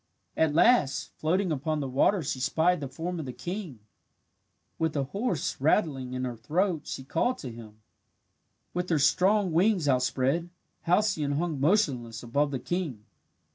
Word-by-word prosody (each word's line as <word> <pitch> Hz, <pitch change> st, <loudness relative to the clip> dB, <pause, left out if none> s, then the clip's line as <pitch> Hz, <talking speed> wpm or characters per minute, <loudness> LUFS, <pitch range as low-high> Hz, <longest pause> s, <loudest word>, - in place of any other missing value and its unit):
At 160 Hz, -2 st, +2 dB
last, 175 Hz, -, +3 dB
floating 180 Hz, +3 st, +1 dB
upon 155 Hz, +1 st, -1 dB
the 140 Hz, -, -2 dB
water 155 Hz, +8 st, +2 dB
she 135 Hz, -, -3 dB
spied 165 Hz, +6 st, +2 dB
the 140 Hz, -, -4 dB
form 165 Hz, +6 st, -5 dB
of 150 Hz, -, -5 dB
the -, -, -4 dB
king. 170 Hz, -, -6 dB, 1.0 s
With 160 Hz, -1 st, 0 dB
a 140 Hz, -, +1 dB
hoarse 195 Hz, -, -2 dB
rattling 135 Hz, -5 st, +1 dB
in 130 Hz, 0 st, -2 dB
her 125 Hz, -1 st, -4 dB
throat 165 Hz, -, -1 dB
she 130 Hz, -, -5 dB
called 165 Hz, -, 0 dB
to 125 Hz, -, -7 dB
him. 110 Hz, -2 st, -12 dB, 0.9 s
With 180 Hz, +1 st, -2 dB
her 165 Hz, -, +3 dB
strong 185 Hz, +7 st, +3 dB
wings 180 Hz, -1 st, +2 dB
outspread, 135 Hz, +5 st, +1 dB, 0.4 s
Halcyone 175 Hz, -6 st, +2 dB
hung 160 Hz, -3 st, -2 dB
motionless 135 Hz, -, +1 dB
above 140 Hz, +5 st, +1 dB
the 140 Hz, -, -2 dB
king. 135 Hz, -, -4 dB
155 Hz, 155 wpm, -28 LUFS, 130-180 Hz, 1.0 s, last